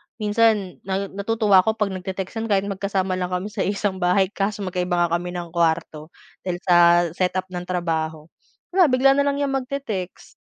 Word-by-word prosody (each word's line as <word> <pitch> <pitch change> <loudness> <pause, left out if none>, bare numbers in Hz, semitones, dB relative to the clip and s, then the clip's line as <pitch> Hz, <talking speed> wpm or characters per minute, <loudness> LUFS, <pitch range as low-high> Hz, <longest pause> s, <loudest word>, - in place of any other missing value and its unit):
minsan 215 -3 +1
na 195 +1 -2
natutuwa 205 -1 +3
ako 220 +4 +1
'pag 210 -2 -1
nagte-textan 190 +4 -5
kahit 200 -2 +2
magkasama 190 -1 -2
lang 180 0 -2
kami 180 +3 -2
sa - - -2
isang 200 -1 -1
bahay 185 +2 +2
kaso 200 0 -2
magkaiba 180 -1 -2
nga - - -13
kami 175 0 -6
ng 175 -2 -6
kuwarto. 160 -2 0 0.3
Dahil 180 -1 -4
sa 175 -2 +3 0.4
set 180 +1 -1
up 185 0 -1
ng 180 0 -6
trabaho. 160 -3 -2 0.4
Wala 365 -3 +5
bigla 260 +1 +4
na 280 +1 +2
lang 280 - +1
yang 285 -1 -1
magte-text. 255 -9 -4
190 Hz, 175 wpm, -22 LUFS, 180-215 Hz, 0.4 s, Wala